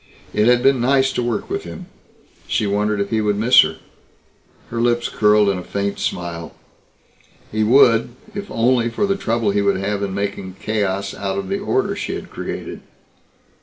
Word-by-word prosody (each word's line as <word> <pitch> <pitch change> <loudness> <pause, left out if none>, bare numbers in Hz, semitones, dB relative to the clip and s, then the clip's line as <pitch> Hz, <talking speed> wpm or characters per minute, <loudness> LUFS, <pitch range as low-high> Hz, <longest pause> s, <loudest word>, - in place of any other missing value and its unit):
It 105 +1 +2
had 125 0 +4
been 135 -2 +4
nice 135 +1 +2
to - - -1
work 120 -2 -2
with - - -3
him. - - -9 0.6
She - - 0
wondered 105 +1 0
if 100 0 -2
he 110 -1 +1
would 105 -1 0
miss 115 +4 +7
her. - - -2 0.9
Her 115 0 -2
lips 120 0 +1
curled 105 -1 +3
in 100 -2 +1
a - - -7
faint 100 +1 -3
smile. 85 -2 -4 1.0
He 110 0 0
would, 120 0 +4 0.2
if 200 0 -6
only 120 0 +2
for 115 - -1
the 195 0 +1
trouble 115 - 0
he 100 0 +1
would 100 -1 +2
have 100 +1 -2
in 100 -1 -3
making 100 -2 -4
chaos 100 -2 -2
out 95 -1 -3
of 100 - -4
the 195 - -1
order 390 - 0
she - - -4
had - - -8
created. - - -6
105 Hz, 185 wpm, -20 LUFS, 100-120 Hz, 1.0 s, miss